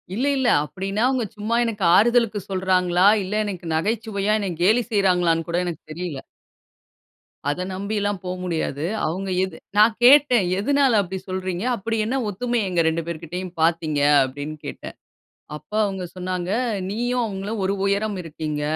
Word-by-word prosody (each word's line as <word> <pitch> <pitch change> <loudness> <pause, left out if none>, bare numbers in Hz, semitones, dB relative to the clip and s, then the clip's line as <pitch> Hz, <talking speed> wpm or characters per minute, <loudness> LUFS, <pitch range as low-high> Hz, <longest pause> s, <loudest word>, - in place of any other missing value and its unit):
இல்லை 270 +5 +1
இல்லை. 250 -3 +2
அப்படின்னா 195 +5 -4
அவுங்க 260 -3 0
சும்மா 215 +3 -1
எனக்கு 215 -3 -3
ஆறுதலுக்கு 230 -2 +3
சொல்றாங்களா! 185 -1 +2 0.2
இல்லை 205 +3 -2
எனக்கு 185 -4 -6
நகைச்சுவையா 210 +2 -1
என்ன 195 -3 -2
கேலி 225 +6 +4
செய்றாங்களான்னு 180 -5 +2
கூட 175 +1 0
எனக்கு 170 -3 -5
தெரியல! 170 -4 -5 1.3
அத 180 +5 -2
நம்பிலாம் 205 0 -2
போமுடியாது. 175 -5 -3 0.2
அவுங்க 190 +5 -3
எது 190 -4 -4 0.2
நான் 215 +1 +6
கேட்டேன் 255 -6 +6
"எதுனால 275 0 +3
அப்டி 190 0 -5
சொல்றீங்க, 185 0 -3
அப்படி 225 +1 -3
என்ன 250 +5 -1
ஒத்துமை 240 +4 -1
எங்க 175 -2 +2
2 165 +1 0
பேர்கிட்டயும் 170 +2 -5
பாத்தீங்க?" 160 -2 +1 0.2
அப்படின்னு 145 +4 -5
கேட்டேன். - - -7 0.6
அப்ப 150 - -13
அவுங்க 195 -2 -4
சொன்னாங்க. 180 0 -3 0.4
"நீயும் 245 +4 -1
அவுங்களும் 205 +1 -4
ஒரு 195 - +1
உயரம் 200 +1 0
இருக்கீங்க. 155 -2 -5
190 Hz, 140 wpm, -23 LUFS, 175-220 Hz, 1.3 s, நான்